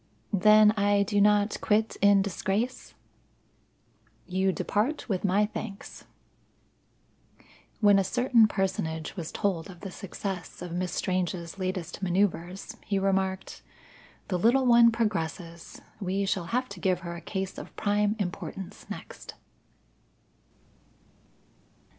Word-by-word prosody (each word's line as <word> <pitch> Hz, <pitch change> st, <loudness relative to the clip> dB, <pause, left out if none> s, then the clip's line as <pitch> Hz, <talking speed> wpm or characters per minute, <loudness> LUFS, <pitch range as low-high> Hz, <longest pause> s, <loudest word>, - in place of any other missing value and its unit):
"Then 210 Hz, +2 st, +6 dB
I 205 Hz, -1 st, +2 dB
do 205 Hz, +1 st, +1 dB
not 205 Hz, 0 st, +3 dB
quit 215 Hz, +1 st, +1 dB
in 200 Hz, -1 st, +5 dB
disgrace?" 200 Hz, +6 st, -3 dB, 1.3 s
"You 190 Hz, +1 st, +1 dB
depart 220 Hz, -, -1 dB
with 190 Hz, -6 st, -1 dB
my 200 Hz, +2 st, +3 dB
thanks." 205 Hz, -1 st, -8 dB, 1.8 s
When 205 Hz, -2 st, +6 dB
a -, -, +2 dB
certain 235 Hz, +2 st, +4 dB
personage 185 Hz, -6 st, -2 dB
was 170 Hz, -5 st, -5 dB
told 185 Hz, -5 st, -1 dB
of 175 Hz, -3 st, -12 dB
the 195 Hz, -, -6 dB
success 190 Hz, -1 st, -6 dB
of 180 Hz, -, -7 dB
Miss 180 Hz, +1 st, -2 dB
Strange's 180 Hz, -1 st, -2 dB
latest 185 Hz, -2 st, -4 dB
manoeuvre, 185 Hz, -1 st, 0 dB, 0.3 s
he 200 Hz, -, -1 dB
remarked: 190 Hz, -1 st, -1 dB, 0.7 s
"The 180 Hz, -3 st, 0 dB
little 245 Hz, +7 st, +4 dB
one 235 Hz, -1 st, +7 dB
progresses. 170 Hz, -6 st, -3 dB, 0.2 s
We 195 Hz, 0 st, -1 dB
shall 190 Hz, -2 st, -1 dB
have 250 Hz, +6 st, -1 dB
to 200 Hz, -, -9 dB
give 185 Hz, 0 st, +1 dB
her 170 Hz, -1 st, -6 dB
a 170 Hz, -, -8 dB
case 190 Hz, +2 st, -4 dB
of -, -, -11 dB
prime 205 Hz, +1 st, +1 dB
importance 190 Hz, -1 st, -6 dB
next." -, -, -9 dB
195 Hz, 120 wpm, -28 LUFS, 180-210 Hz, 1.8 s, one